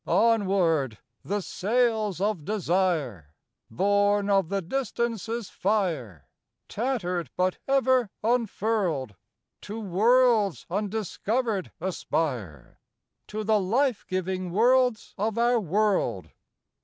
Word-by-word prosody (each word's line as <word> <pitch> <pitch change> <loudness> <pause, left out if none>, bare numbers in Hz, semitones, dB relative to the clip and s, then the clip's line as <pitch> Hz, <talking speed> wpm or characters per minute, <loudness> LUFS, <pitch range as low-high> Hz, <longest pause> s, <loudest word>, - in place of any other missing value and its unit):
— - - -30
Onward! 185 - +2 0.3
the 205 +2 -2
sails 215 -1 0
of 200 -5 -1
Desire, 165 - -1 0.3
Born 205 - +2
of 195 -4 +2
the 200 0 0
Distances' 235 0 -3
fire, 160 - -1 0.4
Tattered 200 -8 -2
but 185 0 0
ever 260 -4 +3
unfurled, 215 - 0 0.5
To 215 +2 -6
worlds 215 - +3
undiscovered 215 +1 -2
aspire— 130 - -3 0.5
To 215 +1 -4
the 215 0 +3
life 235 +5 +1
giving 185 0 -2
worlds 245 +4 +2
of 215 +2 -1
our 240 +1 +3
world. 190 - 0
200 Hz, 95 wpm, -26 LUFS, 180-225 Hz, 0.5 s, ever